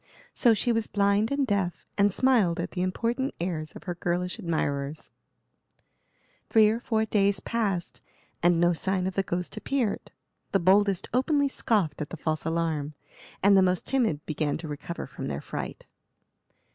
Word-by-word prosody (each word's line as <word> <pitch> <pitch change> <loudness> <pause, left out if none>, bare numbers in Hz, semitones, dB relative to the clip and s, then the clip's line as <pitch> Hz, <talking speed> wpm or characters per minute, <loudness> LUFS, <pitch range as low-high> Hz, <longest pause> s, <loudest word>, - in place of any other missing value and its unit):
So 235 -3 +4
she 240 +3 +1
was 225 -2 0
blind 200 +2 +2
and 280 0 +1
deaf, 200 -6 -1
and 200 0 +3
smiled 210 -8 +3
at 170 - -3
the 180 - -3
important 235 +8 -1
airs 165 -3 -3
of - - -11
her 180 - -3
girlish 175 +1 -2
admirers. 145 -3 -2 1.4
Three 220 -2 +6
or 225 +2 0
four 220 -2 0
days 200 -2 +2
passed, 200 -5 -2 0.4
and 175 0 +4
no 175 +1 +4
sign 185 +2 0
of 190 - -2
the 195 - +1
ghost 180 +2 -4
appeared. 245 -1 -2 0.4
The 195 - +4
boldest 195 +1 +3
openly 280 +3 +2
scoffed 200 - 0
at 150 - -4
the 175 - -7
false 155 0 -2
alarm, 160 -3 -1 0.5
and 200 0 +6
the 190 - +6
most 180 -1 +1
timid 225 - 0
began 150 -1 -1
to 165 - -7
recover 150 +3 -6
from 135 - -7
their 70 -1 -3
fright. - - -6
185 Hz, 165 wpm, -27 LUFS, 170-220 Hz, 1.4 s, Three